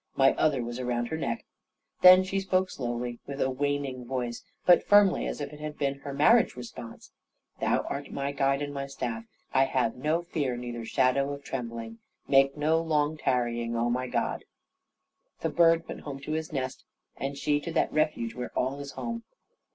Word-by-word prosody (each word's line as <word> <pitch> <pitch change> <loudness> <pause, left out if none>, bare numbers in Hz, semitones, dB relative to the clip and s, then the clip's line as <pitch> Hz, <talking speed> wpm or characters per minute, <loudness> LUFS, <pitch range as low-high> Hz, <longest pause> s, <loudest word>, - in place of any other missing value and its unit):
My 135 0 +5
other 140 -5 +1
was 120 +2 -5
round 120 -1 -1
her 160 - -2
neck. 115 -6 -3 0.6
Then 185 0 +9
she 195 +1 -1
spoke 185 -1 +1
slowly, 120 -1 -4
and 140 0 -5
with - - -9
a - - -2
waning 140 -1 -2
voice; 120 -1 -4 0.2
but 175 - +7
firmly, 205 -2 +5
as - - -4
if 145 0 -5
it 150 - -10
had 150 0 -6
been 140 -1 -1
her 140 - -7
marriage 215 +12 +4
response. 120 -2 -9 0.5
"Thou - - +2
art 140 0 -5
my 140 0 -2
guide, 140 0 +1
and 145 0 -5
my 140 -1 -4
staff. 115 -4 -4 0.3
I 135 +1 +5
have 125 -4 0
no 155 +6 0
fear, 145 -8 -2
neither 120 -1 -5
shadow 135 +4 +2
of 140 0 -8
trembling. 115 -3 -5 0.3
Make 135 +1 +4
no 160 +2 +2
long 155 -2 +1
tarrying, 120 -4 -1
oh 120 +1 +1
my 125 +1 -1
God!" - - -1 1.0
The - - 0
bird 165 -1 +4
went - - -7
home 140 -2 -6
to 155 - -6
his 160 0 -2
nest, 130 -3 -3 0.3
and 140 +1 -4
she 145 +1 +1
to 165 +3 -6
that 165 - +1
refuge 150 -7 0
where 125 +1 -5
all 135 +3 0
is 140 -1 -7
home. 230 -1 -4
140 Hz, 190 wpm, -28 LUFS, 125-150 Hz, 1.0 s, Then